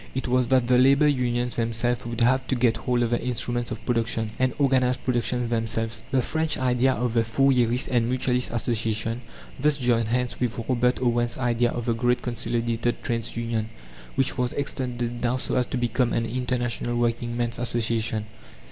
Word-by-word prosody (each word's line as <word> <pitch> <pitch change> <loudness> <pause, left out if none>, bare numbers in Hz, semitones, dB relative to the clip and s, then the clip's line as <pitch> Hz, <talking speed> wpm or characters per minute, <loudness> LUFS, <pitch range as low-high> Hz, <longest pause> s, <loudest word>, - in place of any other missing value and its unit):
It 130 - -2
was 125 0 +2
that 130 -1 +3
the 125 0 +4
labour 140 +3 +5
unions 125 -3 0
themselves 115 +1 -1
would 120 0 -4
have 130 +2 +2
to 130 - 0
get 120 -2 +2
hold 120 +1 0
of 115 - -1
the 120 - +1
instruments 120 -1 -1
of 115 -2 -7
production, 115 -2 0
and 130 0 +2
organize 130 -3 +2
production 125 -1 0
themselves. 115 -1 -1
The 130 -1 +1
French 160 +3 -1
idea 130 0 +2
of 125 -2 -2
the 115 -1 +3
Fourierist 125 0 +2
and 120 -2 +1
Mutualist 125 0 +1
"Association" 115 0 -1 0.4
thus 150 +1 +3
joined 120 -4 +1
hands 125 +2 -1
with 125 -3 -1
Robert 125 -1 +1
Owen's 120 -1 0
idea 120 -1 +1
of 120 -1 -4
"The 120 - +1
Great 120 +2 0
Consolidated 120 -1 -2
Trades' 115 -2 -2
Union," 115 -2 -2 0.5
which 135 0 +1
was 125 -1 0
extended 120 -4 -3
now, 125 +1 +1
so - - -2
as 125 -1 +1
to - - -3
become 120 0 0
an 115 - 0
International 120 0 -2
Working 120 0 -1
men's 120 -1 -1
Association. 115 -2 0
120 Hz, 180 wpm, -25 LUFS, 115-125 Hz, 0.5 s, labour